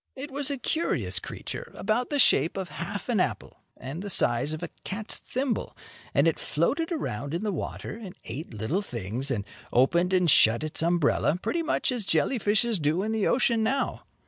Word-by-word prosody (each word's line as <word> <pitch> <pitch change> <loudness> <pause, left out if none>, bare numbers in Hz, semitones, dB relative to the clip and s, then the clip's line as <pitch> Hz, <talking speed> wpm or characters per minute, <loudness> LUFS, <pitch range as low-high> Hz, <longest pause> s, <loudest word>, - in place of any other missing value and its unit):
It 275 +2 -7
was 280 +1 0
a 280 - -2
curious 320 +6 0
creature, - - -7
about 235 +3 0
the 290 - 0
shape 195 - +4
of 190 -2 -3
half 175 +4 -5
an 235 -5 +1
apple, - - -2 0.2
and 135 +7 -6
the 200 - -5
size 120 -5 +3
of 155 +2 -5
a - - -5
cat's 210 +3 -3
thimble, 260 -1 -2 0.4
and - - +5
it 165 - +1
floated 290 - 0
around 145 - -3
in 175 - -2
the 210 - 0
water 195 - -5
and 190 -4 -8
ate 140 +8 -6
little 110 - -1
things 120 - -3
and 105 -7 -1 0.3
opened 170 +9 +3
and 180 -2 +3
shut 115 -4 +5
its 155 0 -3
umbrella, 170 -1 +2
pretty 340 - -1
much 320 -3 0
as 245 -4 -1
jelly 245 +5 +1
fishes 210 +1 +2
do 155 +5 +1
in 220 - -1
the 220 -2 +1
ocean 235 -2 +3
now. 265 +5 0
190 Hz, 195 wpm, -27 LUFS, 150-235 Hz, 0.4 s, and